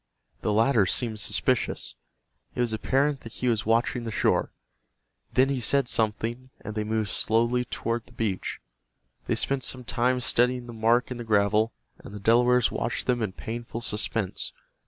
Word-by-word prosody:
The - - 0
latter 110 -1 +4
seemed 110 +1 0
suspicious. 60 - 0 0.6
It - - 0
was 120 -2 0
apparent 135 +5 +1
that 115 - -11
he 125 - -2
was 110 -3 +1
watching 115 +2 +2
the 115 - -4
shore. 110 - +1 0.8
Then 130 +1 +5
he 135 -2 -1
said 135 +3 +3
something, 115 +3 -1
and 110 0 -6
they 105 0 -1
moved 110 -1 -1
slowly 120 +2 +1
toward 115 0 -3
the - - -18
beach. 110 -6 -2 0.7
They - - +1
spent 135 -1 0
some 130 -1 -3
time 125 +2 +1
studying 125 0 +2
the 120 - -8
mark 115 +3 +2
in 125 - -3
the 120 - -5
gravel, 105 +1 +2 0.3
and 100 - -10
the - - -6
Delawares 120 +3 +4
watched 120 - -2
them 125 -2 +1
in 105 -4 -2
painful 115 +2 -6
suspense. 105 -3 -2
115 Hz, 170 wpm, -27 LUFS, 110-125 Hz, 0.8 s, Then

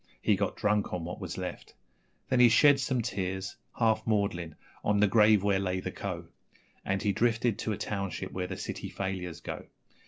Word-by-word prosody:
He - - +3
got - - -1
drunk 105 0 +1
on 85 -2 -4
what 90 - -6
was - - -5
left; - - -6 0.5
Then 130 - +2
he 120 -1 +8
shed 140 +4 +6
some 130 -2 0
tears, 95 -1 -3 0.2
half 110 -2 +3
maudlin, 95 -7 0 0.3
on 105 0 +2
the 105 - +6
grave 105 -1 +5
where 100 -1 +2
lay 95 -1 -1
the - - -4
Co., - - -5 0.6
And 95 0 -1
he 105 - +2
drifted 115 +1 +1
to 110 - -2
a 105 - -2
township 100 -2 -3
where 90 -1 -3
the 95 - -5
city - - -5
failures 95 -3 -4
go. - - -6
100 Hz, 190 wpm, -30 LUFS, 95-110 Hz, 0.6 s, he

